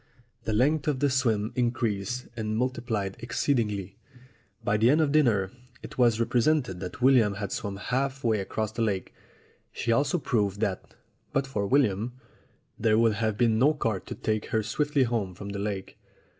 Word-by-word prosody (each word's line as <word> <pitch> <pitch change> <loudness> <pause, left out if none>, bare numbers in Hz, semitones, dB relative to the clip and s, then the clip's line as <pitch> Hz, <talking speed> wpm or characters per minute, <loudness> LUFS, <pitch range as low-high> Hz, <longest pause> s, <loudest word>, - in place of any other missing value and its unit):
The 110 - 0
length 140 +7 +2
of 145 -4 +1
the 145 0 +2
swim 115 -5 +1
increased 120 -2 -1
and 110 -1 -2
multiplied 115 -6 -2
exceedingly. 110 -5 -1 0.7
By 105 - +2
the 115 +3 +4
end 150 +4 +4
of 155 -3 +2
dinner 115 -11 +3 0.3
it - - -9
was 120 -2 +4
represented 120 - +1
that 95 +6 -6
William 120 -6 +5
had 100 0 -4
swum 100 -1 -3
half 130 +5 -2
way 110 -3 +2
across 105 +2 -3
the 115 - -4
lake. 100 -4 -1 0.6
She 115 - -2
also 140 +7 +2
proved 105 - 0
that, 100 -4 -3 0.4
but 135 0 +1
for 105 -7 -2
William, 120 -3 +2 0.7
there 110 -1 +3
would 115 -1 +4
have 110 0 -1
been 115 -1 +3
no 145 +5 +4
cart 115 -9 -2
to - - -5
take 110 -1 -1
her 110 -1 0
swiftly 145 +5 +1
home 110 -7 -1
from 100 +2 -7
the 100 0 -4
lake. 100 -2 -4
115 Hz, 170 wpm, -27 LUFS, 105-130 Hz, 0.7 s, William